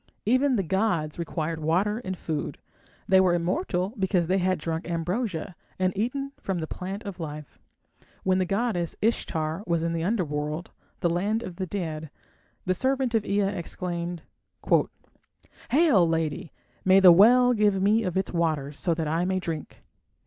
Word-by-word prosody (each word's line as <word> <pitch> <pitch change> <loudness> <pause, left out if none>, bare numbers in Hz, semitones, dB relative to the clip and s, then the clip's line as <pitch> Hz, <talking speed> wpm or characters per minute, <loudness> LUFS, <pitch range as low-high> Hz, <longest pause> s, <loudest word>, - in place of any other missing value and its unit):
Even 255 +4 +3
the 200 - +1
gods 170 -4 0
required 165 -1 -3
water 185 +8 +1
and 185 -6 -5
food; 155 -3 -4 0.5
they 190 0 +6
were 180 -2 +3
immortal 180 - -1
because 185 -2 +2
they 185 +3 +1
had 185 0 +1
drunk 160 +2 -4
ambrosia 175 +1 -2 0.2
and 185 0 0
eaten 275 +7 -2
from 190 -2 -2
the 160 - -2
plant 190 +5 -6
of 200 -4 -7
life. 150 -3 -7 0.6
When 185 0 +2
the 185 - 0
goddess 195 -4 -1
Ishtar 165 -6 -1
was 170 -1 +1
in 165 0 -1
the 165 -1 -2
Underworld, 155 -5 -2 0.3
the 175 - +2
land 205 +6 0
of 180 -2 -8
the 185 - -3
dead, 160 -5 -4 0.6
the 185 - +2
servant 260 +3 0
of 225 -2 +2
Ea 200 +1 +2
exclaimed 175 -2 -4 1.5
"Hail! 260 - +4
lady, 160 -1 -2 0.3
may 190 +1 +6
the 185 -2 +9
well 245 +7 +6
give 210 -3 +2
me 210 +4 +3
of 185 -4 -2
its 190 - -1
waters, 155 -4 -1
so 170 -2 +1
that 160 -2 -2
I 165 +3 0
may 185 +1 0
drink." 165 -4 -6
185 Hz, 165 wpm, -26 LUFS, 165-205 Hz, 1.5 s, the